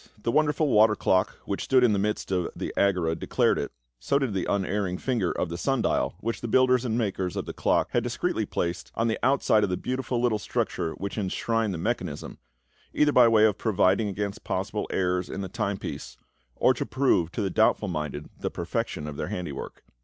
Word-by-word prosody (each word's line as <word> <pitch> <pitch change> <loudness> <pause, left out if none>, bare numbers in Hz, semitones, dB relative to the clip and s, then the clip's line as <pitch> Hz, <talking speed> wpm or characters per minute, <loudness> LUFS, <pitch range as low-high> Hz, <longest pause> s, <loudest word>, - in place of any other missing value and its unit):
The 115 - +1
wonderful 150 +1 +2
water 110 -4 +5
clock 95 0 +1
which 100 - -3
stood 130 -1 +4
in 115 -4 +4
the 100 - +1
midst 105 0 -2
of 90 -2 0
the - - -4
Agora 90 -5 +2
declared 80 - +1
it, - - -3 0.3
so 140 - +1
did 135 -6 -1
the 95 - -1
unerring 95 -1 -1
finger 115 -8 0
of 90 - -2
the 85 +1 -5
sun 135 0 0
dial, - - 0
which 115 +1 -3
the 120 - -3
builders 125 +1 +4
and 115 -2 -1
makers 95 -5 -1
of - - -3
the - - -6
clock - - +1
had 120 - +2
discreetly 120 - -2
placed 85 0 -3
on 115 - +1
the 110 - -1
outside 125 -5 +3
of - - +1
the 90 - -1
beautiful 130 -1 -2
little 120 -3 +1
structure 80 -4 -2
which 100 +2 -5
enshrined 110 +3 0
the 90 - -3
mechanism, 90 -5 -3 0.6
either 150 0 +4
by 125 -4 +6
way 110 -1 +5
of 105 -2 +1
providing 105 -1 +2
against 100 0 -4
possible - - -2
errors 90 -1 0
in 100 - -4
the 95 - -3
time 100 -1 -2
piece, - - -7 0.4
or - - +4
to - - -3
prove 130 -11 +1
to - - -2
the 95 - -1
doubtful 110 0 +3
minded 75 -4 -4
the - - -2
perfection 75 - -3
of 75 -1 -6
their - - -3
handiwork. 90 -6 -6
105 Hz, 210 wpm, -26 LUFS, 90-120 Hz, 0.6 s, by